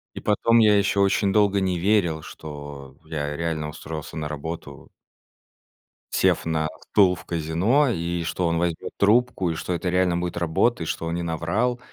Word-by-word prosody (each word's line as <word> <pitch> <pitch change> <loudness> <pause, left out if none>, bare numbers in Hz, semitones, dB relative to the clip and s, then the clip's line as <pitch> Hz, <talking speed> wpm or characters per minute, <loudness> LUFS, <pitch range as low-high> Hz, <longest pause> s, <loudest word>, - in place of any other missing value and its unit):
И - - -6
потом 115 +2 +3
я 105 -2 +5
ещё 100 0 +2
очень 100 0 +2
долго 100 -2 +3
не 95 -2 0
верил, 85 -4 +1
что 70 -4 -9
я 75 -2 -4
реально 80 -1 -2
устроился 80 0 -7
на 75 -2 -4
работу 80 +3 -7 1.2
сев - - +2
на 80 -1 0 0.2
стул 95 -3 +5
в - - -13
казино, 85 - +1
и 85 -4 -2
что 85 +2 -1
он 85 0 0
возьмёт 85 -1 -2
трубку, 105 -3 +2
и - - -3
что 80 +3 -3
это 90 +1 -2
реально 90 -1 +2
будет 90 -1 -3
работа, 85 +5 +1
и - - -5
что 85 - -3
он 85 +1 -2
не 85 - -3
наврал. 85 +10 -1
85 Hz, 175 wpm, -24 LUFS, 80-100 Hz, 1.2 s, я